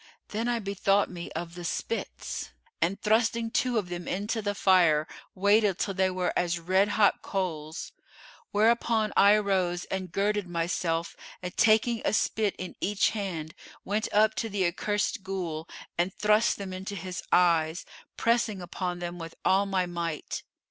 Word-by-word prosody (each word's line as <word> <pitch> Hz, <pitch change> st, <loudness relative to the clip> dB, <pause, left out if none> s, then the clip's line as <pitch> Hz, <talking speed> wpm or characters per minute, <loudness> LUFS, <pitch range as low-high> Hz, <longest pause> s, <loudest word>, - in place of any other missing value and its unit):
Then 225 Hz, +3 st, -2 dB
I 240 Hz, -1 st, +1 dB
bethought 200 Hz, -1 st, +1 dB
me 170 Hz, -1 st, -7 dB
of 170 Hz, +1 st, -5 dB
the 175 Hz, 0 st, -8 dB
spits 225 Hz, +6 st, -4 dB, 0.3 s
and 195 Hz, +4 st, +1 dB
thrusting 225 Hz, +2 st, +1 dB
two 250 Hz, -1 st, +1 dB
of 195 Hz, -5 st, -1 dB
them 175 Hz, -1 st, -5 dB
into 210 Hz, +4 st, -2 dB
the 205 Hz, -1 st, -2 dB
fire, 170 Hz, -6 st, +4 dB, 0.3 s
waited 200 Hz, 0 st, +3 dB
till 200 Hz, -, -1 dB
they 190 Hz, 0 st, +2 dB
were 185 Hz, -1 st, -1 dB
as 175 Hz, 0 st, +1 dB
red 185 Hz, +4 st, +3 dB
hot 205 Hz, 0 st, +3 dB
coals: 165 Hz, -5 st, -4 dB, 0.6 s
whereupon 220 Hz, 0 st, +2 dB
I 200 Hz, +1 st, +7 dB
arose 190 Hz, -4 st, +1 dB
and 185 Hz, -2 st, -3 dB
girded 205 Hz, 0 st, 0 dB
myself 170 Hz, -1 st, -1 dB, 0.3 s
and 180 Hz, 0 st, -5 dB
taking 225 Hz, +1 st, +3 dB
a -, -, +1 dB
spit 215 Hz, -1 st, +1 dB
in 185 Hz, -, -6 dB
each 205 Hz, 0 st, +2 dB
hand 175 Hz, -7 st, -4 dB, 0.3 s
went 210 Hz, +2 st, -1 dB
up 215 Hz, +1 st, +4 dB
to 225 Hz, +3 st, -1 dB
the 195 Hz, -2 st, 0 dB
accursed 205 Hz, +5 st, -1 dB
Ghul 175 Hz, -4 st, -4 dB, 0.3 s
and 175 Hz, +2 st, +2 dB
thrust 210 Hz, +3 st, +2 dB
them 195 Hz, -2 st, -6 dB
into 190 Hz, +2 st, -5 dB
his 185 Hz, -1 st, -5 dB
eyes, 165 Hz, -1 st, +3 dB, 0.3 s
pressing 230 Hz, -3 st, +1 dB
upon 180 Hz, 0 st, -4 dB
them 175 Hz, 0 st, -5 dB
with 165 Hz, 0 st, -8 dB
all 195 Hz, +1 st, +4 dB
my 190 Hz, -2 st, +1 dB
might. 170 Hz, -3 st, -4 dB
190 Hz, 160 wpm, -28 LUFS, 175-210 Hz, 0.6 s, I